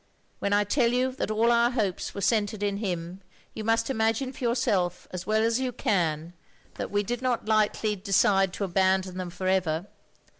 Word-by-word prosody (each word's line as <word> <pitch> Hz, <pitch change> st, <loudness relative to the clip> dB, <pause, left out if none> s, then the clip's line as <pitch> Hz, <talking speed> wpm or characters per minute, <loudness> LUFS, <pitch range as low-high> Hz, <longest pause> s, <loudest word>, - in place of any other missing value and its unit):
When 200 Hz, -, -1 dB
I 205 Hz, 0 st, +4 dB
tell 235 Hz, +3 st, +2 dB
you 255 Hz, +1 st, +1 dB
that 255 Hz, -, -4 dB
all 225 Hz, +2 st, +2 dB
our 235 Hz, 0 st, +4 dB
hopes 215 Hz, -8 st, -2 dB
were 200 Hz, -, -4 dB
centred 210 Hz, 0 st, 0 dB
in 200 Hz, -1 st, 0 dB
him, 180 Hz, -2 st, -4 dB, 0.3 s
you 220 Hz, -, -6 dB
must 225 Hz, +1 st, +1 dB
imagine 225 Hz, +2 st, 0 dB
for -, -, -9 dB
your 235 Hz, 0 st, +2 dB
self, 180 Hz, -8 st, 0 dB
as 180 Hz, 0 st, -6 dB
well 215 Hz, +1 st, +2 dB
as 230 Hz, +2 st, +2 dB
you 260 Hz, -1 st, -1 dB
can, 170 Hz, -7 st, -1 dB, 0.4 s
that -, -, -5 dB
we 205 Hz, 0 st, 0 dB
did 240 Hz, +4 st, -3 dB
not 255 Hz, -2 st, -1 dB
lightly 215 Hz, 0 st, +1 dB
OF 195 Hz, -2 st, -10 dB
GROSVENOR 200 Hz, -2 st, -3 dB
SQUARE 200 Hz, -, +5 dB
29 195 Hz, 0 st, +4 dB
decide 185 Hz, -, -15 dB
to 200 Hz, -, -4 dB
abandon 190 Hz, 0 st, +1 dB
them 180 Hz, -1 st, -4 dB
for 180 Hz, +2 st, -5 dB
ever. 180 Hz, -3 st, +1 dB
205 Hz, 220 wpm, -27 LUFS, 185-230 Hz, 0.4 s, SQUARE